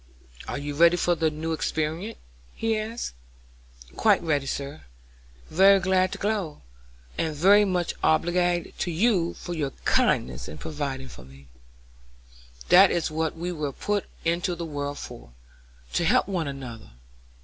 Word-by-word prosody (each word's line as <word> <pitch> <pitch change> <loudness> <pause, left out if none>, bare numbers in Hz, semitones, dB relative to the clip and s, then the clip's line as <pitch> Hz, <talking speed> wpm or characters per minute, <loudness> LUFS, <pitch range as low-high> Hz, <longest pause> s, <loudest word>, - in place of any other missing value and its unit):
"Are - - -3
you 145 +1 -4
ready 170 +4 +5
for 175 0 +2
the 160 -1 +1
new 155 +2 -4
experiment?" 160 +7 -2 0.4
he 225 0 0
asked. 220 +2 -4 0.8
"Quite - - +3
ready, 145 -4 0
sir; 140 +2 -5 0.7
very 195 +3 +6
glad 185 0 +2
to - - -5
go, 200 - -2 0.6
and 160 -2 -1
very 200 +7 +6
much 180 -3 -1
obliged 175 +2 +1
to - - -1
you 175 -1 +1
for 175 - -6
your 150 -4 -1 0.2
kindness - - +1
in 75 - -8
providing 140 -4 -4
for 65 - -12
me." 70 +1 -16 1.2
"That 190 +1 +8
is 165 -2 -1
what 160 +1 -2
we 175 +2 -3
were 150 -5 -3
put 205 +6 -1 0.2
into 170 +1 0
the 170 0 -5
world 145 -2 -4
for, 115 - -10 0.6
to - - +1
help - - +3
one 180 -6 -2
another. 125 - -8
165 Hz, 150 wpm, -26 LUFS, 145-180 Hz, 1.2 s, That